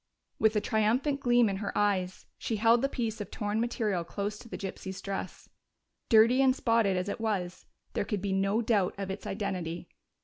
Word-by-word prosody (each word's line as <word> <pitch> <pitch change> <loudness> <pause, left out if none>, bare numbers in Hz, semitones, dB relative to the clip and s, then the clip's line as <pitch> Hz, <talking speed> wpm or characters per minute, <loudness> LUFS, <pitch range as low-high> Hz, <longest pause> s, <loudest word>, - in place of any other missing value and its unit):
With 220 0 +3
a 210 - +2
triumphant 235 +8 +1
gleam 240 -3 +4
in 195 -1 -1
her 200 0 -3
eyes, 190 -3 0
she 225 - -2
held 230 +2 +4
the 275 - +1
piece 225 -5 -3
of 205 - -6
torn 210 +1 -2
material 220 -7 -1
close 205 +4 -4
to 235 - -13
the - - -5
gypsy's 190 -1 -6
dress. 195 -1 -5 0.6
Dirty 230 +3 +6
and 260 -1 +4
spotted 225 -7 +2
as 180 +2 -2
it 205 - -4
was, 185 -5 -2 0.3
there - - 0
could 210 -1 -2
be 195 0 -2
no 195 +4 +1
doubt 205 -5 +1
of 195 -1 -4
its 195 - -6
identity. 180 -5 -4
210 Hz, 195 wpm, -29 LUFS, 195-230 Hz, 0.6 s, Dirty